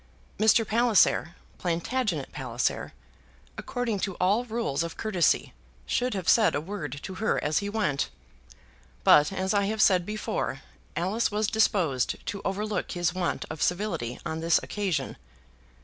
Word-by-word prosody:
Mr. 220 Hz, +1 st, +4 dB
Palliser, 220 Hz, -7 st, +3 dB, 0.2 s
Plantagenet 175 Hz, -, -1 dB
Palliser, -, -, -2 dB, 0.6 s
according 245 Hz, -5 st, -2 dB
to 195 Hz, -1 st, -2 dB
all 200 Hz, +8 st, +2 dB
rules 225 Hz, -, -1 dB
of 170 Hz, 0 st, -4 dB
courtesy 190 Hz, -, +1 dB, 0.3 s
should 250 Hz, -, 0 dB
have 185 Hz, -4 st, -4 dB
said 220 Hz, -3 st, +5 dB
a -, -, +1 dB
word 150 Hz, -5 st, -5 dB
to 190 Hz, -, -6 dB
her 220 Hz, -, +2 dB
as 150 Hz, 0 st, +1 dB
he 200 Hz, -, -3 dB
went; 195 Hz, -10 st, 0 dB, 0.9 s
but, 150 Hz, +3 st, +6 dB
as 190 Hz, 0 st, -1 dB
I 200 Hz, -1 st, +2 dB
have 215 Hz, +2 st, -2 dB
said 185 Hz, -4 st, +5 dB
before, 175 Hz, -, -3 dB, 0.3 s
Alice 195 Hz, +7 st, 0 dB
was 210 Hz, +1 st, 0 dB
disposed 190 Hz, -, +1 dB
to 200 Hz, -, -4 dB
overlook 205 Hz, +2 st, -2 dB
his 175 Hz, -2 st, 0 dB
want 185 Hz, -2 st, -2 dB
of 160 Hz, -, -7 dB
civility 180 Hz, -, -1 dB
on 160 Hz, -, -3 dB
this 165 Hz, 0 st, +3 dB
occasion. 200 Hz, -5 st, -2 dB
195 Hz, 145 wpm, -27 LUFS, 165-215 Hz, 0.9 s, but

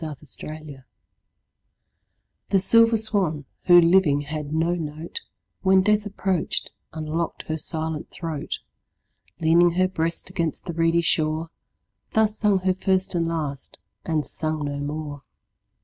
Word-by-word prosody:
6 150 Hz, -3 st, -6 dB, 0.2 s
Autoplay 155 Hz, -3 st, -8 dB, 1.7 s
The 195 Hz, -, +4 dB
silver 230 Hz, +4 st, +5 dB
swan, 195 Hz, -9 st, 0 dB, 0.2 s
who 175 Hz, -1 st, +8 dB
living 170 Hz, -4 st, +4 dB
had 150 Hz, 0 st, -5 dB
no 165 Hz, +2 st, +1 dB
note, 160 Hz, -, -5 dB, 0.4 s
When 190 Hz, -1 st, +4 dB
death 210 Hz, +1 st, +2 dB
approach'd, 190 Hz, -4 st, -1 dB, 0.2 s
unlock'd 160 Hz, +1 st, -3 dB
her 155 Hz, -, 0 dB
silent 160 Hz, 0 st, -3 dB
throat; 160 Hz, -4 st, -4 dB, 0.8 s
Leaning 170 Hz, +2 st, +5 dB
her 185 Hz, +1 st, +3 dB
breast 165 Hz, -2 st, -2 dB
against 170 Hz, -4 st, -2 dB
the 170 Hz, -, -4 dB
reedy 165 Hz, +1 st, +2 dB
shore, 160 Hz, 0 st, +1 dB, 0.6 s
Thus 215 Hz, -1 st, +3 dB
sung 205 Hz, -3 st, +2 dB
her 185 Hz, 0 st, +2 dB
first 190 Hz, 0 st, 0 dB
and 170 Hz, -1 st, 0 dB
last, 150 Hz, -5 st, -4 dB, 0.3 s
and 155 Hz, -2 st, -1 dB
sung 155 Hz, -2 st, -2 dB
no 145 Hz, 0 st, -3 dB
more. 145 Hz, 0 st, -5 dB
165 Hz, 130 wpm, -24 LUFS, 155-185 Hz, 1.7 s, who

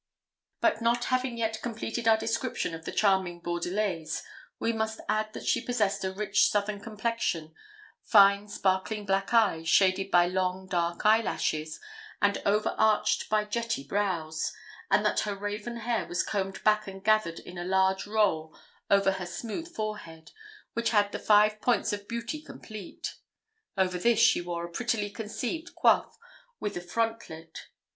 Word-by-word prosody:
But -, -, +2 dB
not 235 Hz, +1 st, +2 dB
having 255 Hz, -2 st, 0 dB
yet 220 Hz, -1 st, -2 dB
completed 230 Hz, 0 st, -3 dB
our 220 Hz, -1 st, +6 dB
description 230 Hz, -4 st, -2 dB
of 165 Hz, 0 st, -8 dB
the -, -, -4 dB
charming 190 Hz, -4 st, +2 dB
Bordelaise 175 Hz, -1 st, -2 dB, 0.3 s
we 230 Hz, -, 0 dB
must 220 Hz, 0 st, -2 dB
add 215 Hz, 0 st, 0 dB
that -, -, -7 dB
she -, -, +2 dB
possessed 215 Hz, -7 st, 0 dB
a 190 Hz, -, -1 dB
rich 205 Hz, +1 st, +2 dB
southern 205 Hz, 0 st, -1 dB
complexion, 215 Hz, -7 st, -2 dB, 0.5 s
fine 200 Hz, -1 st, +5 dB
sparkling 205 Hz, +1 st, -1 dB
black 195 Hz, 0 st, 0 dB
eyes, 195 Hz, -9 st, +3 dB
shaded 190 Hz, +1 st, +3 dB
by 175 Hz, -2 st, +5 dB
long 185 Hz, +1 st, -1 dB
dark 175 Hz, -1 st, -1 dB
eye 220 Hz, +2 st, +6 dB
lashes, 155 Hz, -7 st, -2 dB, 0.4 s
and 200 Hz, 0 st, +2 dB
over 210 Hz, +1 st, +2 dB
arched 215 Hz, -1 st, +2 dB
by 215 Hz, 0 st, +2 dB
jetty 230 Hz, -6 st, -2 dB
brows, 165 Hz, -3 st, -1 dB, 0.4 s
and -, -, +3 dB
that -, -, +2 dB
her 205 Hz, -1 st, -2 dB
raven 205 Hz, +4 st, -4 dB
hair 235 Hz, 0 st, -1 dB
was 175 Hz, -, 0 dB
combed 195 Hz, -2 st, -3 dB
back 215 Hz, 0 st, +3 dB
and 195 Hz, 0 st, -9 dB
gathered 215 Hz, -6 st, +2 dB
in 180 Hz, 0 st, -9 dB
a -, -, -3 dB
large 190 Hz, +1 st, +1 dB
roll 195 Hz, -8 st, +1 dB, 0.3 s
over 200 Hz, -1 st, +4 dB
her 190 Hz, -1 st, -4 dB
smooth 240 Hz, -, -5 dB
forehead, 210 Hz, -, -6 dB, 0.4 s
which 235 Hz, 0 st, 0 dB
had 205 Hz, -2 st, +3 dB
the -, -, -4 dB
five 210 Hz, 0 st, +4 dB
points 240 Hz, -3 st, +1 dB
of 205 Hz, 0 st, -5 dB
beauty 235 Hz, +6 st, -4 dB
complete. 215 Hz, -, -8 dB, 0.6 s
Over 185 Hz, -1 st, +1 dB
this 235 Hz, +4 st, +3 dB
she 225 Hz, -, +5 dB
wore 170 Hz, -1 st, -4 dB
a 170 Hz, -, -10 dB
prettily 215 Hz, 0 st, -1 dB
conceived 230 Hz, +11 st, -5 dB
coif, -, -, +3 dB, 0.4 s
with 210 Hz, -, -3 dB
a 175 Hz, -, -3 dB
frontlet. 175 Hz, -5 st, -4 dB
205 Hz, 160 wpm, -28 LUFS, 185-220 Hz, 0.6 s, our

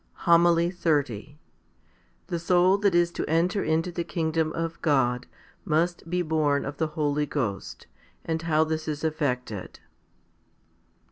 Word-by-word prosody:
v -, -, -20 dB
HOMILY 170 Hz, 0 st, +4 dB
XXX 145 Hz, -, -1 dB, 0.9 s
The 170 Hz, -, -3 dB
soul 180 Hz, +3 st, +3 dB
that 200 Hz, -3 st, +2 dB
is 175 Hz, 0 st, +3 dB
to -, -, -4 dB
enter 175 Hz, +5 st, +1 dB
into 160 Hz, +3 st, 0 dB
the 170 Hz, 0 st, -3 dB
kingdom 160 Hz, -2 st, -1 dB
of 165 Hz, 0 st, -4 dB
God 125 Hz, -5 st, +1 dB, 0.4 s
must 170 Hz, -1 st, 0 dB
be 180 Hz, +1 st, 0 dB
born 155 Hz, -3 st, +1 dB
of 140 Hz, +1 st, -6 dB
the 160 Hz, -, 0 dB
Holy 150 Hz, -1 st, 0 dB
Ghost; 115 Hz, -10 st, -4 dB, 0.4 s
and 160 Hz, -1 st, -2 dB
how 160 Hz, -2 st, +2 dB
this 160 Hz, 0 st, -3 dB
is 150 Hz, 0 st, -3 dB
effected. 125 Hz, -, -3 dB
160 Hz, 140 wpm, -26 LUFS, 145-170 Hz, 0.9 s, HOMILY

